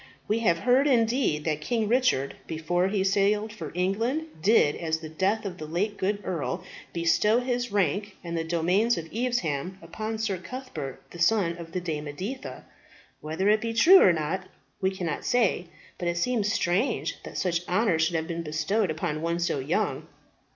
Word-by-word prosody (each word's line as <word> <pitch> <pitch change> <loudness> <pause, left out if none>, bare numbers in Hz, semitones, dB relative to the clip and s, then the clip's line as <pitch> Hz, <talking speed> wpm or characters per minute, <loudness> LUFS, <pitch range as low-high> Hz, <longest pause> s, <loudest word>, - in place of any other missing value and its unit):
We 215 +2 +1
have 185 -7 +3
heard 255 - +3
indeed 230 - +2
that 155 -2 -1
King 225 +6 0
Richard, 230 - +2
before 170 +3 0
he 195 -1 0
sailed 205 +2 +2
for 165 -9 -7
England, 225 - 0 0.2
did, 190 -6 +4
at 160 -2 -4
the 160 0 -1
death 195 +7 0
of 180 -2 -5
the 155 - -6
late 200 +6 -2
good 200 +1 -1
earl, 175 +1 -2 0.3
bestow 175 +6 +3
his 245 -2 -2
rank 205 0 0
and 170 -1 -4
the 165 - -1
domains 175 +8 +2
of 165 -1 -5
Evesham 190 - -1
upon 215 +6 -5
Sir 210 -4 -1
Cuthbert, 185 - -7
the 175 - -10
son 170 -1 +3
of 165 -1 -9
the 185 - 0
Dame 155 -4 -3
Editha. 195 - -6 0.5
Whether 160 +6 -2
it 215 +1 +4
be 230 0 -2
true 345 +12 +8
or 185 - +7
not, 170 +4 -2 0.3
we 190 - +3
cannot 180 -5 -3
say; 225 -7 +1 0.3
but 175 - -2
it 170 0 0
seems 215 +1 +1
strange 190 +4 0
that - - -8
such 175 -2 0
honour 185 -3 +2
should 160 +1 +1
have 160 0 -1
been 170 -1 -3
bestowed 165 +6 0
upon 155 -1 -2
one 170 +1 0
so 170 -4 0
young. 135 - -1
185 Hz, 180 wpm, -27 LUFS, 165-220 Hz, 0.5 s, true